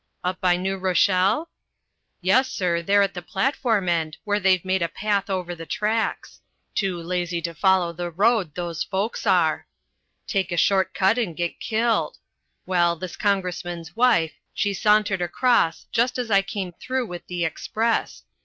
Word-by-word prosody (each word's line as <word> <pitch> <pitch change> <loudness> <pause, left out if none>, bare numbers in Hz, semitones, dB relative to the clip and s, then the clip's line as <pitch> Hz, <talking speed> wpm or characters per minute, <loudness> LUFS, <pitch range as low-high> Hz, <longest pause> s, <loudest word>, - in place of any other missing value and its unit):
"Up 180 +1 -2
by 180 -1 +3
New 190 +2 -2
Rochelle?" 190 - +2 0.7
"Yes, 245 +9 +3
sir, 170 -2 0
there 200 +4 +4
at 200 0 -1
the 175 - -6
platform 220 - 0
end, 160 -2 0
where 205 -1 0
they've 185 -3 +2
made 185 0 +1
a 170 - +1
path 200 +1 -1
over 180 -2 -2
the 165 -1 -9
tracks. 215 +4 -2 0.3
Too 190 -3 -1
lazy 175 0 -2
to 170 0 -3
follow 180 0 +2
the 175 +1 -4
road, 195 -2 +1
those 170 -2 -4
folks 200 +3 -3
are. - - +2 0.6
Take 195 -2 -1
a 175 - -1
short 190 +2 +2
cut 195 +5 +3
and 180 -9 -2
get 175 -1 -3
killed. 230 +1 0 0.5
Well, 175 -2 +2
this 180 +1 -7
congressman's 175 -4 -2
wife, 225 -10 +3 0.2
she 205 -1 0
sauntered 210 0 +2
across 175 0 +2
just 240 +2 +1
as 245 -3 -3
I 195 -1 +5
came 195 -2 -5
through 255 +8 -3
with 175 -4 -8
the 175 -1 -2
express. 225 +8 -1
190 Hz, 165 wpm, -24 LUFS, 175-210 Hz, 0.7 s, I